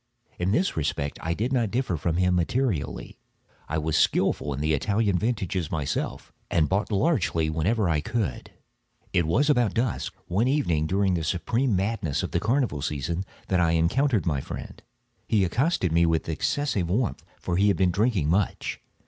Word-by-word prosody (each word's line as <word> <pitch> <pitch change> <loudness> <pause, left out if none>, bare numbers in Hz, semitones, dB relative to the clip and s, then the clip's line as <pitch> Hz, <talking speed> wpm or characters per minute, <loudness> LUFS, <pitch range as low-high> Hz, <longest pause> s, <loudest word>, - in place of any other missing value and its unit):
In 90 +2 +1
this 180 - +1
respect 75 -2 -2
I 85 +1 -1
did 120 +7 -1
not 120 -5 +1
differ 120 -5 -1
from 80 +2 -1
him 90 0 +2
materially: 90 - -1 0.5
I 80 - -1
was 80 0 -1
skilful 75 - +2
in 70 - -3
the 75 +1 +1
Italian 100 +4 +1
vintages 95 -7 -1
myself, 75 -4 -3 0.2
and 80 -3 +2
bought 100 +6 0
largely 95 - +1
whenever 95 +7 +1
I 80 -3 +1
could. 110 +2 -3 0.6
It 85 -3 +2
was 130 - +2
about 120 -9 +2
dusk, 115 +1 -1
one 105 +8 +1
evening 85 - +1
during 95 +2 +1
the 85 -2 -1
supreme 110 - 0
madness 95 -6 -1
of - - -4
the - - +1
carnival 115 - 0
season, 75 +6 -2 0.2
that 95 - +1
I 85 -2 +3
encountered 110 - +2
my 75 -6 0
friend. - - -8 0.5
He 105 -4 +3
accosted 115 - +1
me 85 +1 +4
with 80 -1 0
excessive 95 - -1
warmth, 110 +5 -1 0.2
for 85 - -2
he 100 +2 +4
had 100 - +3
been 95 -2 +3
drinking 100 -4 +1
much. 95 +5 0
95 Hz, 175 wpm, -26 LUFS, 80-115 Hz, 0.6 s, me